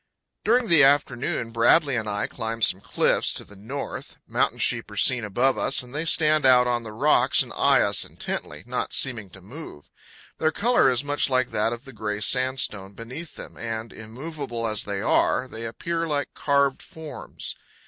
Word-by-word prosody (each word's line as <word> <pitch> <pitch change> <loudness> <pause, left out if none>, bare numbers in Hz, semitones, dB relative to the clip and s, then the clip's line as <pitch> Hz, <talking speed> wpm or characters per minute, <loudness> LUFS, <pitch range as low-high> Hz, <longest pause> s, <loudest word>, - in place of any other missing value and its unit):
During 240 +2 +2
the 165 -5 +6
afternoon 135 -4 +1
Bradley 125 +5 +3
and 110 -3 -2
I 105 0 -1
climb 115 0 -4
some 95 - +2
cliffs - - +1
to - - -5
the 105 - -16
north. 120 +9 -7
Mountain - - 0
sheep - - 0
are - - -10
seen 125 -2 +3
above 120 +6 +1
us, - - +1
and 125 +1 -14
they 155 +3 -2
stand 155 -2 +3
out 125 -1 +6
on 120 -1 0
the 110 -2 -8
rocks 135 +8 +3
and - - -10
eye - - +4
us - - +1
intently, 75 +3 -6
not 125 +1 -3
seeming 110 -7 +1
to 95 +1 -14
move. 105 - -11 0.5
Their 155 0 +2
color 235 - +3
is 130 +1 0
much 145 0 0
like 130 -1 +1
that 105 +2 0
of 120 +3 -7
the 135 - -11
gray 105 -2 -3
sandstone 125 -5 0
beneath 130 +10 -8
them, - - -10
and, 115 0 -5
immovable 120 +1 -6
as 110 -1 0
they 100 -1 -3
are, 130 - +2
they 115 -2 -7
appear 165 +8 -3
like 145 -4 -1
carved 140 -2 +1
forms. 160 -2 -7
125 Hz, 185 wpm, -24 LUFS, 110-145 Hz, 0.5 s, the